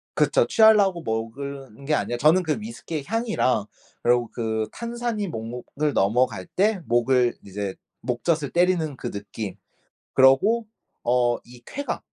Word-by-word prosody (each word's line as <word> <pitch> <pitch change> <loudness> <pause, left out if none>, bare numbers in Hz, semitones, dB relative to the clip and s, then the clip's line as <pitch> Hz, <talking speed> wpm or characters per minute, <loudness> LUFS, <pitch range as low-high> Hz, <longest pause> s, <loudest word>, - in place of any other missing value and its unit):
그쵸. - - +3
취하려고 205 -6 +5
먹을 135 +4 -4
은 135 +6 -14
게 150 - 0
아니라 120 - -1
저는 160 +7 +4
그 160 +5 -1
위스키의 170 -9 -6
향이랑 215 - 0 0.4
그러고 120 -1 +3
그 110 -2 -1
탄산이 235 -3 -3
목 110 -10 -5
목을 140 +5 -3
넘어갈 105 -1 +1
때 205 +1 +1
목을 120 +1 +2
이제 100 0 -4 0.3
목젖을 145 +4 -1
때리는 170 -5 +2
그 - - -4
느낌 100 -1 -6 0.6
그러고 195 - +5 0.4
어 120 0 +2
이 120 0 -15
쾌감 285 +1 -4
135 Hz, 280 characters per minute, -24 LUFS, 120-185 Hz, 0.6 s, 취하려고